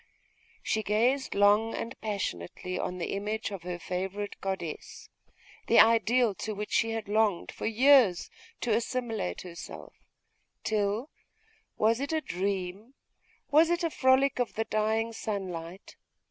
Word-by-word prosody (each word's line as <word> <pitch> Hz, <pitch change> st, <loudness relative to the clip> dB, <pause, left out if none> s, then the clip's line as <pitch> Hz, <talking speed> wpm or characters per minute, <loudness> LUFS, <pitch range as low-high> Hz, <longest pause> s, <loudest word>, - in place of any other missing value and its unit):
She 220 Hz, -, 0 dB
gazed 240 Hz, +6 st, +1 dB
long 205 Hz, +3 st, +4 dB
and 230 Hz, -, -4 dB
passionately 185 Hz, -, -4 dB
on 180 Hz, -, -3 dB
the 175 Hz, -, -3 dB
image 210 Hz, +2 st, -3 dB
of 195 Hz, -3 st, -6 dB
her 175 Hz, 0 st, -5 dB
favourite 190 Hz, +4 st, -4 dB
goddess, 190 Hz, -5 st, -5 dB, 0.6 s
the -, -, +5 dB
ideal 230 Hz, +1 st, +5 dB
to 215 Hz, -1 st, -3 dB
which 210 Hz, +1 st, -5 dB
she 230 Hz, -, +2 dB
had 225 Hz, -2 st, -3 dB
longed 210 Hz, -3 st, +1 dB
for -, -, -4 dB
years 235 Hz, -, +4 dB, 0.3 s
to 235 Hz, -, +1 dB
assimilate 230 Hz, -, -2 dB
herself; 170 Hz, -2 st, -9 dB, 0.7 s
till 215 Hz, +5 st, -1 dB, 0.7 s
was 225 Hz, +2 st, +3 dB
it 280 Hz, +2 st, -3 dB
a 315 Hz, -, +2 dB
dream? 195 Hz, -, -4 dB, 0.6 s
was 315 Hz, +3 st, +6 dB
it 345 Hz, 0 st, 0 dB
a 335 Hz, -, 0 dB
frolic 260 Hz, 0 st, +3 dB
of 245 Hz, -, -1 dB
the 225 Hz, -, -1 dB
dying 220 Hz, +1 st, 0 dB
sunlight? 185 Hz, -4 st, -6 dB
215 Hz, 135 wpm, -29 LUFS, 190-230 Hz, 0.7 s, was